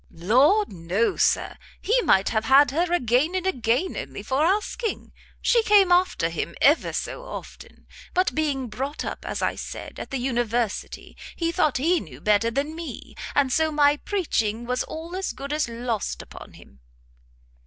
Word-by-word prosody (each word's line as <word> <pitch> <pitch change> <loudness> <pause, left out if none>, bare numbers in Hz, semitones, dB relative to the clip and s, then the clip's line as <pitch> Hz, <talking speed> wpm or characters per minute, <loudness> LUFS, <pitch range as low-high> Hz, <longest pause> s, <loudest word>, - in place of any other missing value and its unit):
"Lord, 260 - +3
no, 180 +6 0
Sir! - - +1 0.2
he 485 +4 +2
might 195 - +3
have 220 0 -1
had 270 +2 +6
her 340 +4 0
again 285 +2 +2
and 370 0 -1
again 255 0 0
only - - -6
for 270 +3 0
asking! 420 +6 -1 0.3
She 475 - +4
came 410 -4 +5
after 355 - +3
him 170 0 -4
ever 295 +4 +4
so - - -4
often; - - -10 0.3
but 365 +1 +2
being 285 -4 -1
brought 270 +7 -4
up, - - -5
as - - -3
I - - +1
said, - - -8
at - - -7
the 270 - -2
university, 240 -3 -2 0.2
he 335 -1 -1
thought 305 -4 +1
he 335 +6 +2
knew 135 -7 -11
better 210 +6 +2
than 280 +6 -2
me, 330 -1 -8 0.2
and 270 -3 +2
so 315 +2 +2
my 290 -1 +4
preaching 240 - -1
was 250 +1 -1
all 330 +3 -7
as 380 0 -3
good 280 +1 -6
as 300 -5 0
lost 230 -2 -3
upon - - -12
him." 65 - -17
280 Hz, 170 wpm, -24 LUFS, 230-345 Hz, 0.3 s, had